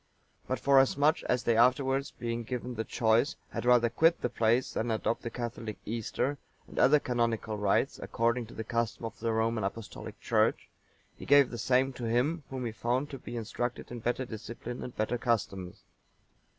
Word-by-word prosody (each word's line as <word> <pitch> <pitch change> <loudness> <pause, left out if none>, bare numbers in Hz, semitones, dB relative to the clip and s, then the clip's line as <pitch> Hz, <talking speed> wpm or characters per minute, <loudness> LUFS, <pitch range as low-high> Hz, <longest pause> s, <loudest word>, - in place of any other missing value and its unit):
But, 130 -1 -1
forasmuch 140 +3 +4
as 125 0 +1
they 115 - +2
afterwards, 135 +3 +3
being 120 0 -4
given 125 +1 -4
the 110 -1 -2
choice, 115 +4 +2 0.2
had - - -4
rather 120 -1 +5
quit 165 +8 +3
the 125 - -1
place 120 +2 +2
than 120 - -1
adopt 110 +1 0
the 120 - -4
Catholic 115 -2 -5
Easter 120 +5 -2 0.3
and - - -6
other 150 +3 +6
canonical 115 -4 -1
rites, 105 -1 +1
according 115 0 0
to - - -13
the 110 - -4
custom 115 0 -2
of 115 - -7
the 115 0 0
Roman 110 0 0
Apostolic 105 +3 -6
Church, - - +1 0.5
he - - -10
gave 140 -2 +6
the 120 - -5
same 130 +3 +2
to 125 - -6
him 125 +9 +1
whom 130 -2 -4
he 115 - -2
found 125 +5 -1
to 135 - -6
be 120 0 -7
instructed 120 +2 -4
in 120 - -5
better 120 +3 -1
discipline 120 +2 -7
and 125 - -7
better 110 +3 0
customs. 95 -7 -2
120 Hz, 180 wpm, -30 LUFS, 115-130 Hz, 0.5 s, other